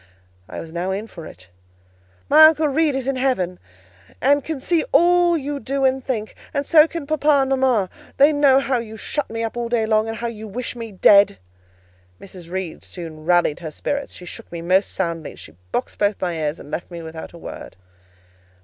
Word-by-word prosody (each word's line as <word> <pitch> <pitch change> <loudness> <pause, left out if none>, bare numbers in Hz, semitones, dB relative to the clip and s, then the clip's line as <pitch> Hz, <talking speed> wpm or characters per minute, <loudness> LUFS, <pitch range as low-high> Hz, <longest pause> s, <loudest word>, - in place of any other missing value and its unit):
I - - -6
was 160 -1 -9
now 175 +2 -2
in 195 +3 -3
for 165 -7 -10
it. 95 +1 -14 0.8
"My 310 +2 +8
Uncle 315 -1 +2
Reed 295 0 +1
is 265 -1 -3
in 275 -1 0
heaven, 220 -9 0 0.6
and 285 +1 +3
can 315 -1 -4
see 330 +4 +1
all 345 +2 +4
you 285 -1 -4
do 270 +3 -1
and 265 0 +1
think; 220 -5 -3 0.2
and 280 0 0
so 315 0 +6
can 330 -3 -6
papa 305 0 0
and 275 -2 +4
mama: 260 -7 +2 0.3
they 285 +2 +6
know 280 -2 +5
how 270 -2 0
you 220 -1 -8
shut 295 +5 -3
me 225 0 -3
up 225 - -4
all 240 -1 -3
day 230 -2 +1
long, 220 0 +2
and 225 0 -4
how 235 - -5
you 220 -2 -5
wish 245 +5 -5
me 230 -2 -7
dead." 200 - +5 0.8
Mrs. 180 -3 -12
Reed 185 -2 -5
soon 160 -3 -9
rallied 175 -3 +2
her 165 -2 -6
spirits: 280 - -4
she 180 - -10
shook - - -10
me 170 -1 -6
most 185 +3 +2
soundly, 170 -4 -3
she 80 - -12 0.2
boxed - - -3
both 205 0 +1
my 180 -2 -1
ears, 155 0 -2
and - - -12
then - - -13
left 175 - -4
me 170 -2 -8
without 160 +1 -8
a - - -11
word. - - -9
230 Hz, 210 wpm, -21 LUFS, 180-280 Hz, 0.8 s, My